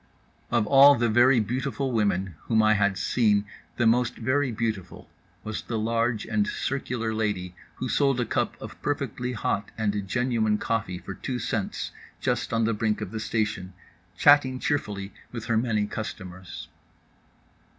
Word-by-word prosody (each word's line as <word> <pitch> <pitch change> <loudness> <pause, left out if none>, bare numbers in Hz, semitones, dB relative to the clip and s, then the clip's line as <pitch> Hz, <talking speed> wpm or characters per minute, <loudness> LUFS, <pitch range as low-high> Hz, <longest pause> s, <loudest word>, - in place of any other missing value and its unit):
Of 120 -3 +2
all 140 +3 +8
the 120 0 +1
very 120 +3 +5
beautiful 130 +4 -2
women 100 -5 0
whom 110 -1 +3
I 110 0 +5
had 100 -2 +2
seen 105 0 +2 0.3
the 120 - +2
most 125 +2 +3
very 130 +3 0
beautiful 110 -5 -4 0.4
was 110 0 -4
the 115 - -4
large 115 0 0
and 105 -2 0
circular 120 -4 -2
lady 105 -5 -2 0.2
who 130 - -4
sold 135 +2 +2
a 120 - +1
cup - - -1
of - - -10
perfectly 125 0 -2
hot 105 -2 -1
and 105 -2 -1
genuine 115 -1 +1
coffee 105 -5 -2
for 95 - -7
two 125 +6 -4
cents, 105 -4 -3 0.3
just - - -1
on 115 0 +1
the 115 - +1
brink 105 0 0
of 105 -3 -5
the 110 - -4
station, 105 -4 -2 0.4
chatting 145 -3 +5
cheerfully 100 -9 -2 0.2
with 115 -2 -6
her 115 -1 0
many 110 -2 +1
customers. 95 -4 -7
110 Hz, 155 wpm, -26 LUFS, 105-125 Hz, 0.4 s, all